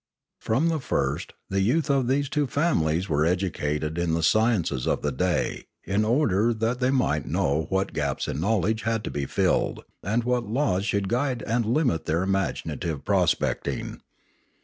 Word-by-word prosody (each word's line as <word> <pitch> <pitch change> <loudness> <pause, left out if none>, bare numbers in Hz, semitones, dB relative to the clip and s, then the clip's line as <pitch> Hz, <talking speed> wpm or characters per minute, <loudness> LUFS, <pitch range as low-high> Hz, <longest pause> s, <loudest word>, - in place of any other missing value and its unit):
From 135 +10 +1
the 160 -2 0
first 70 - -2 0.2
the 95 0 +1
youth 130 +11 +2
of 135 -3 +2
these 140 +2 +1
two 145 +1 0
families 95 - +1
were 75 -3 +1
educated 80 -3 -1
in 85 -2 +1
the 85 - -1
sciences 105 - +2
of - - 0
the 75 - 0
day 90 +7 -1 0.2
in 100 +2 0
order 115 -2 +2
that 115 +3 -1
they 125 0 +2
might 125 - +1
know 75 +3 0
what 95 +1 0
gaps 70 -3 -2
in - - -3
knowledge 110 +2 +1
had 115 -2 -1
to - - -4
be 70 -2 -3
filled, - - 0 0.2
and 110 +5 0
what 125 -1 0
laws 110 -6 +1
should 100 -2 0
guide 125 +1 -1
and 115 0 0
limit 120 - +1
their 80 +3 +1
imaginative 95 -5 -2
prospecting. - - 0
100 Hz, 170 wpm, -25 LUFS, 80-120 Hz, 0.2 s, youth